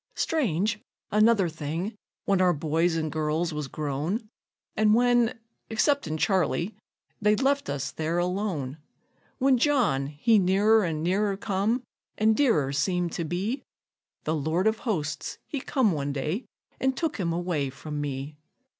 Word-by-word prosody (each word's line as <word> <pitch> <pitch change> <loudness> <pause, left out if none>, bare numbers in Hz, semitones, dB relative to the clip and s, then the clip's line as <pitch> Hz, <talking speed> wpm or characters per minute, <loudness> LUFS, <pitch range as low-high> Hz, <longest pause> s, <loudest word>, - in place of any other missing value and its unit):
Strange, 215 - 0 0.3
another 215 -2 +4
thing: 165 +6 -4 0.3
when 195 -2 +2
our 180 -1 +4
boys 160 +3 +1
an' 155 -1 -2
girls 155 +2 -1
was 150 -2 -3
grown, 155 - -3 0.5
And 215 0 +4
when, 245 -1 +3 0.3
exceptin' 220 - +1
Charley, 185 +2 +1 0.5
they'd 210 +3 +3
left 280 +1 +1
us 140 -2 -2
there 160 +2 -2
alone; 175 -6 -2 0.6
When 265 -2 +3
John 235 - +2
he 155 +10 +3
nearer 205 +4 +4
an' 160 -3 -2
nearer 195 +3 +1
come, 210 +5 0 0.3
an' 220 +1 +4
dearer 190 - +2
seemed 175 +4 0
to 170 - -3
be, 195 - -2 0.6
The 155 - 0
Lord 160 +5 0
of 220 0 +2
Hosts 175 +5 -2
he 280 - -4
come 255 -8 +2
one 145 -3 -2
day 155 - -2 0.3
an' 265 0 +2
took 315 +2 -2
him 175 -5 -1
away 165 -5 -1
from 145 +2 -6
me. 140 +1 -4
180 Hz, 145 wpm, -27 LUFS, 155-220 Hz, 0.6 s, another